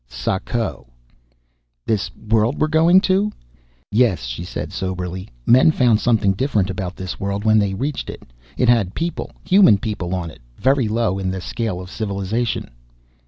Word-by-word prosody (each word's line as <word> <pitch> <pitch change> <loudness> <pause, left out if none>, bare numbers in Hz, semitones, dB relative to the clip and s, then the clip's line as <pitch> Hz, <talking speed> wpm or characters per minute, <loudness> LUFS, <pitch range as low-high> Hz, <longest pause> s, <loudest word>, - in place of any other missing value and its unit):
"Sako." 75 - -3 1.0
"This 105 -3 0
world 110 +4 0
we're 155 - +2
going 165 +4 +5
to?" 195 +2 +1 0.6
"Yes," 110 - +2
she - - -5
said 90 - -6
soberly. 95 -1 -4 0.2
"Men 130 +5 +6
found 125 -8 +3
something 110 -5 +2
different 100 -4 0
about 95 -2 -4
this 95 -2 -6
world 100 +1 -3
when 110 0 +5
they 100 -2 0
reached 140 +7 -3
it. - - -8 0.3
It 125 - +2
had 115 -6 +3
people 170 +1 -3 0.2
human 185 - +6
people 95 -3 -3
on 85 -3 -4
it, - - -16 0.2
very 135 -3 +2
low 105 -3 0
in 95 -1 -2
the 95 0 -3
scale 110 0 -3
of 90 +1 -9
civilization." 105 - -2
105 Hz, 160 wpm, -20 LUFS, 95-120 Hz, 1.0 s, Men